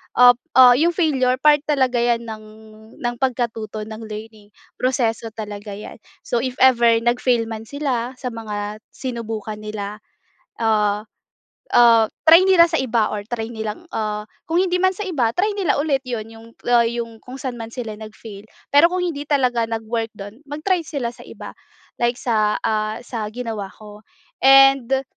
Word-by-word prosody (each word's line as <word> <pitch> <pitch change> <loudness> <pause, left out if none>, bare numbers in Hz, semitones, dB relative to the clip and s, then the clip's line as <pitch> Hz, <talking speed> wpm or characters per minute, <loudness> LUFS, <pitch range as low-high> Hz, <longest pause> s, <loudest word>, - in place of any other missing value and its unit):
ah 245 0 +8 0.2
ah, 255 -1 +9
yung 340 +2 +2
failure, 265 -7 +2
part 295 +3 +4
talaga 260 -4 +1
'yan 235 0 +1
ng 220 -2 -8 0.6
ng 240 0 -1
pagkatuto, 230 -4 -2
ng 220 0 -8
learning. 215 0 -9 0.3
Proseso 240 -3 0
talaga 205 -1 -7
'yan, 210 +2 -10 0.2
so 240 - -1
if 255 +1 -3
ever 240 -2 +5 0.2
nag-fail 240 0 +2
man 220 0 -7
sila 260 -3 -3
sa 250 -1 -5
mga 210 -2 -5 0.2
sinubukan 225 -4 -5
nila, 210 -1 -6 0.6
ah, 210 -1 +1 0.7
ah, 230 -2 +6 0.2
try 330 +2 +8
nila 365 -3 +7
sa 325 -3 0
iba 230 -5 0
or 205 0 -5
try 240 -2 -3
nilang, 220 +5 -5
ah, 210 -1 -3 0.2
kung 330 - 0
hindi 360 -1 0
man 375 0 +2
sa 415 - -4
iba, 255 - -1
try 415 +4 +1
nila 395 -4 0
ulit 285 -2 +1
'yun 235 -3 -3
yung, 225 0 -13 0.2
ah, 240 -1 +4
yung 230 -1 -5
kung 255 +1 -10
sa'n 255 -3 -5
man 225 - -6
sila 230 -2 -6
nag-fail. 215 -1 -11 0.2
Pero 290 +4 +7
kung 360 0 -2
hindi 295 -4 -4
talaga 250 -5 +1
nag-work 225 0 -3
do'n, 205 +5 -10
mag-try 335 +6 0
sila 275 -7 -4
sa - - -14
iba, - - -9 0.5
like 240 0 +1
sa, 215 -4 +1
ah 215 0 -1
sa 225 -3 -4
ginawa 220 -3 -5
ko. 210 +1 -14 0.4
And 270 -1 +5
235 Hz, 165 wpm, -21 LUFS, 220-265 Hz, 0.7 s, ah